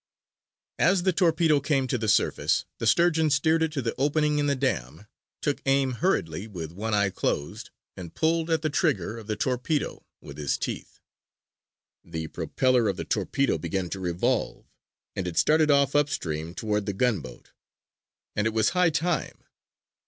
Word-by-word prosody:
As 175 +2 +3
the 185 0 +2
torpedo 165 -4 +3
came 140 -1 0
to 130 0 -1
the 110 - -2
surface, 105 - +2
the - - -1
Sturgeon 165 -2 +3
steered 160 +3 +2
it 160 -1 +1
to 140 -4 -2
the 115 - -1
opening 150 +1 +2
in 145 - +1
the 140 - +2
dam, 105 - -2 0.4
took 145 - -1
aim 135 -1 +3
hurriedly 105 - -1
with 85 -7 -7
one 105 +5 -2
eye 100 -2 +2
closed, 75 -5 -3 0.3
and 85 -3 -9
pulled 165 +1 +1
at 160 -1 +1
the 155 - +1
trigger 105 -2 0
of 110 - -12
the 105 - -1
torpedo 130 +5 -2 0.2
with 70 +1 -11
his 75 -2 0
teeth. - - -6 1.0
The 80 -2 -6
propeller 130 -3 +1
of 95 - -2
the - - -4
torpedo 135 - 0
began 85 +2 -3
to 95 - -4
revolve, 90 -1 -1 0.5
and 95 -2 -3
it 85 - -5
started 155 0 +4
off 140 -1 +3
upstream 85 - -1
toward 105 -3 -2
the 100 - -1
gunboat. 95 - -2 0.8
And 105 +1 +1
it 110 - -2
was 110 -1 +3
high 180 -1 +3
time. 160 0 -2
125 Hz, 165 wpm, -26 LUFS, 95-155 Hz, 1.0 s, started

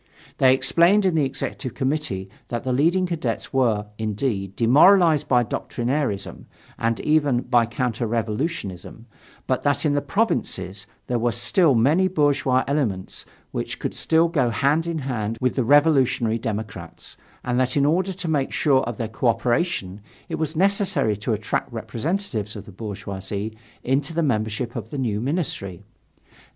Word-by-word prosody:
They 130 -1 +6
explained 175 +8 +3
in 185 - +3
the 155 -3 +2
Executive 130 -2 -4
Committee 130 -9 -2 0.2
that 120 -1 -4
the 130 - -1
leading 170 +8 +2
Cadets 155 -10 -3
were, 115 -6 +2
indeed, 105 -3 -2
demoralized 155 - +5
by 125 -2 +4
doctrinairism 120 -2 -3 0.3
and 115 0 0
even 145 -5 +2
by 120 -2 +3
counter 120 -1 -2
revolutionism, 115 - -3 0.4
but 130 - 0
that 145 +2 +1
in 145 - +2
the 145 - +1
provinces 100 - -2 0.2
there 120 -1 -1
were 120 +1 +1
still 140 - +3
many 150 +11 +3
bourgeois 140 -6 +2
elements 120 -10 -2 0.2
which - - -4
could - - -4
still 165 +1 +2
go 140 -8 +1
hand 140 +9 +1
in 170 -1 -2
hand 115 -6 -3
with 125 -1 +1
the 130 - 0
revolutionary 135 -4 +3
democrats, 105 -6 -6 0.3
and 125 0 0
that 130 +2 +1
in 140 - +3
order 180 +6 +1
to 185 -1 -6
make 145 -4 0
sure 135 -3 +3
of 115 -2 -5
their 115 - -2
co 110 +3 -2
operation 115 - 0 0.3
it - - -3
was 160 0 -2
necessary 195 - +2
to 105 +3 -3
attract 105 0 -2
representatives 120 - -3
of 105 - -8
the - - -11
bourgeoisie 100 +1 -5 0.3
into 140 +5 0
the 170 - +1
membership 110 -2 -1
of 110 -2 -5
the 145 - -6
new 110 -5 -1
ministry. 125 - -3
125 Hz, 155 wpm, -23 LUFS, 110-150 Hz, 0.4 s, They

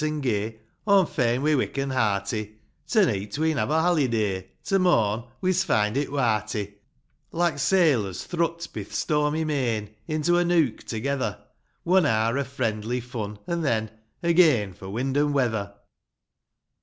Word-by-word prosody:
Aw'm 200 -2 +5
fain 125 -4 0
we're 155 -1 +3
wick 135 - -2
an' 135 0 -1
hearty; 105 -2 -1 0.3
To 215 -4 +4
neet 105 - -2
we'n 160 -1 +1
have - - 0
a 160 +1 +2
haliday 115 - +1
— - - -44
To 195 - +1
morn 115 - +2 0.2
we's 185 -1 +2
find 105 -6 +1
it 140 +1 0
warty 110 -6 -1 0.3
:' - - -46 0.2
Like 170 -4 0
sailors, 135 - +2
thrut^ 170 -1 -2
bi - - -4
th' - - -11
stormy 150 0 0
main 120 -9 -1
Into 155 +3 +1
a - - +3
nook 165 -8 +2
together, 120 -1 -2 0.3
— - - -44
One 180 -2 +4
hour 110 0 +1
o' - - +1
friendly, 120 -3 -2
fun 110 -4 -6
an' 170 0 -2
then, 110 -7 0 0.3
Again 160 - +4
for 95 +1 -10
wind 130 +6 -2
and 145 0 +2
weather. 110 -7 0
130 Hz, 155 wpm, -25 LUFS, 110-160 Hz, 0.3 s, Aw'm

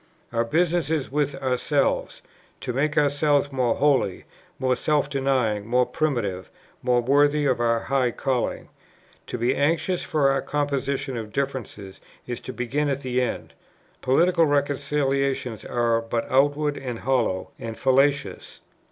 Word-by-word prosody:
"Our 115 0 +2
business 165 +4 +1
is 155 -5 -1
with 145 -1 0
ourselves, 130 +3 0 0.4
to 125 - -3
make 150 +4 0
ourselves 145 0 +2
more 125 -3 +1
holy, 135 -10 +1 0.3
more 130 -1 +1
self 150 +2 0
denying, 130 -7 0
more 125 +1 +3
primitive, 115 - -2 0.3
more 125 -1 +2
worthy 145 +3 +3
of 130 -3 +1
our 115 -1 +2
high 130 -2 +1
calling. 130 +1 -2 0.6
To - - -4
be 120 +2 +1
anxious 160 +5 +1
for 140 -3 +2
a 135 - 0
composition 140 -2 -2
of 110 -2 -6
differences 115 -7 -4 0.2
is 120 -1 -5
to - - -7
begin 135 +5 -1
at 140 0 -2
the 125 0 0
end. 125 - -3 0.5
Political 165 +5 +3
reconciliations 140 -4 0
are 115 -1 +1
but 115 0 -2
outward 145 +2 +2
and 125 -3 -5
hollow, 120 -7 0
and 115 -1 -6
fallacious. 140 +2 +1
135 Hz, 140 wpm, -24 LUFS, 120-145 Hz, 0.6 s, more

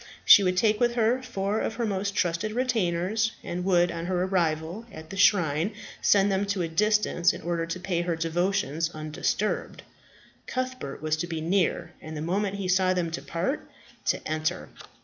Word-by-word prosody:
She - - +9
would 185 -1 +1
take 210 +2 +3
with 240 -1 +2
her 240 +2 +2
four 210 -4 -2
of 225 - -2
her 235 +1 -1
most 200 -1 -2
trusted 175 +5 0
retainers, 220 -3 0
and 175 +1 -4
would 175 -2 +3
on 170 0 -5
her 180 -1 0
arrival 170 +1 -1
at 160 -1 -10
the - - -6
shrine 175 0 +3 0.3
send 200 0 +4
them 195 +1 0
to 200 -3 -1
a - - -1
distance, 210 0 +2
in - - -9
order 170 -1 -1
to 170 +2 -4
pay 180 -2 -1
her 175 -1 -1
devotions 165 -1 0
undisturbed. 155 +7 -2 0.6
Cuthbert 255 - -4
was 155 0 +1
to 175 +2 -3
be 165 -2 -3
near, 170 0 0
and 155 0 -7
the - - -4
moment 195 +4 -1
he 200 -2 -3
saw 185 0 +3
them 170 -2 -1
depart, 165 - -3 0.4
to - - 0
enter. 155 +3 -2
180 Hz, 180 wpm, -27 LUFS, 165-205 Hz, 0.6 s, She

